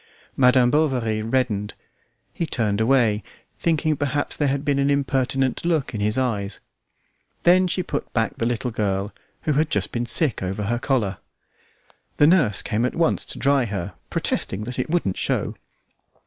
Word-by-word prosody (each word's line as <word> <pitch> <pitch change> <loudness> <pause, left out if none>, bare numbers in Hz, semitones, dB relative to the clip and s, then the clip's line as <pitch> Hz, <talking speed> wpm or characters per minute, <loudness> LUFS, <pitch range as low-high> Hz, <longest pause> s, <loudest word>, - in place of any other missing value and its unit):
Madam 125 -1 +4
Bovary 125 -8 +1
reddened; 110 -3 -1 0.6
he 170 - -2
turned 110 -6 0
away, 115 -3 +3 0.4
thinking 160 -2 +1
perhaps 145 +1 -1
there 145 - +1
had 140 +1 -1
been 140 -2 +1
an 140 +1 +2
impertinent 135 -2 0
look 160 -6 0
in 105 - -3
his 105 +3 0
eyes. 105 -6 -1 0.8
Then 180 +1 +5
she 185 +1 -1
put - - -4
back 115 -2 -1
the 115 - +1
little 120 +1 -2
girl, 100 -2 -1 0.3
who 155 - +1
had 155 +2 +1
just 100 -2 -1
been 120 0 -2
sick 145 -1 +1
over 95 +3 -3
her 120 +4 -1
collar. 115 -8 0 1.0
The 145 - +6
nurse 155 - +4
at 120 +2 0
once 165 -1 +1
came - - 0
to - - -10
dry 140 -2 +3
her, 100 -3 -4 0.2
protesting 95 - -1
that 125 +3 -5
it 125 - -2
wouldn't 155 - 0
show. - - -1
125 Hz, 165 wpm, -23 LUFS, 105-145 Hz, 1.0 s, The